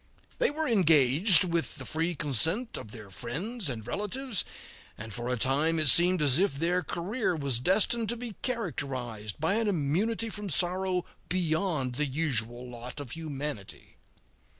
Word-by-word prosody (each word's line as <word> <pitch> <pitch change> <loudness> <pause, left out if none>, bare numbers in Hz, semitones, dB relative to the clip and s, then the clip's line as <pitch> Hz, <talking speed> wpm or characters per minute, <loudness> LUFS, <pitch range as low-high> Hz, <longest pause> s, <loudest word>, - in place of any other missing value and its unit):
They - - +3
were 310 +1 -2
engaged, 165 - +5
with 170 -7 -1
the 135 - -8
free 165 +4 -1
consent 160 - 0
of 105 - -7
their 105 -3 -11
friends 165 - -4
and 110 -4 -5
relatives, 210 - -2 0.5
and 110 0 -7
for 120 +2 -4
a 125 - 0
time 145 +7 +1
it 155 -2 +4
seemed 175 0 +5
as 140 +1 +5
if 190 -7 +2
their 170 +5 +1
career 180 +4 -2
was 140 -6 0
destined 215 - +2
to, 240 - -1
be 235 -2 -6
characterized 130 - -4
by 160 +5 +1
an 225 -1 0
immunity 205 +7 0
from 205 -1 -6
sorrow 180 +2 +1 0.2
beyond 160 -6 0
the 150 - +3
usual 125 -5 -1
lot 120 +2 -8
of 140 -5 -7
humanity. 145 -9 -6
160 Hz, 155 wpm, -29 LUFS, 130-195 Hz, 0.5 s, engaged